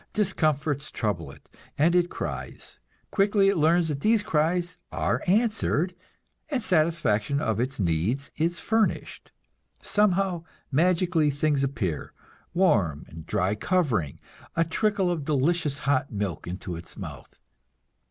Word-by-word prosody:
Discomforts 155 -7 0
trouble 105 -3 -2
it, - - -15 0.3
and 160 +4 +4
it 175 -1 +3
cries. - - -6 0.3
Quickly 200 -1 +3
it 200 - +2
learns 165 +2 +3
that 145 -3 -2
these 215 +4 +3
cries 170 +1 0
are - - 0
answered, 195 -4 +2 0.6
and 270 -6 -1
satisfaction 155 - +1
of 110 -7 -1
its 130 +1 -2
needs 95 - 0
is 170 +2 0
furnished. 220 -1 -1 0.5
Somehow, 195 -4 +1 0.3
magically, 170 +1 +3
things 145 0 +1
appear; 100 - -2 0.4
warm 100 - +2
and 80 0 -11
dry 95 +3 +1
covering, 110 - 0 0.4
a 165 - +3
trickle 190 +2 +1
of 165 -4 -2
delicious 150 +1 +1
hot 135 -1 +1
milk 100 -8 -3
into 90 0 -5
its 85 0 -10
mouth. - - -9
155 Hz, 125 wpm, -26 LUFS, 130-180 Hz, 0.6 s, and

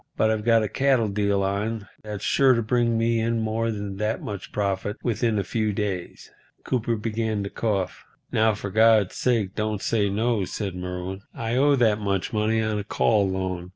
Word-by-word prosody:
But 110 - +3
I've 110 -1 -1
got 115 -1 +4
a - - 0
cattle 130 0 +2
deal 100 -1 +1
on 100 +2 -2
that's 105 -2 -6
sure 135 -2 +4
to 115 - 0
bring 115 0 +1
me 115 0 +2
in 115 +1 0
more 110 +1 -1
than 100 -3 -4
that 105 +2 -1
much 100 -2 -7
profit 100 +1 -2
within 115 -1 0
a 100 - +1
few 110 +1 -1
days." 100 -4 -4 0.3
Cooper 120 -2 0
began 110 -1 -2
to 100 - -5
cough. 100 -5 -2 0.3
"Now, 110 -1 +3
for 100 -1 -6
God's 110 -2 +4
sake 110 -7 0
don't 110 -1 -2
say 105 -3 +1
no," 110 +1 0
said 100 0 -4
Merwin. 90 +1 -5
"I 115 +1 -2
owe 140 +2 +4
that 110 -5 +3
much 100 +1 -1
money 110 +1 +1
on 110 -1 -1
a - - -3
call 100 -1 +2
loan. 95 -2 -3
110 Hz, 190 wpm, -25 LUFS, 100-115 Hz, 0.3 s, got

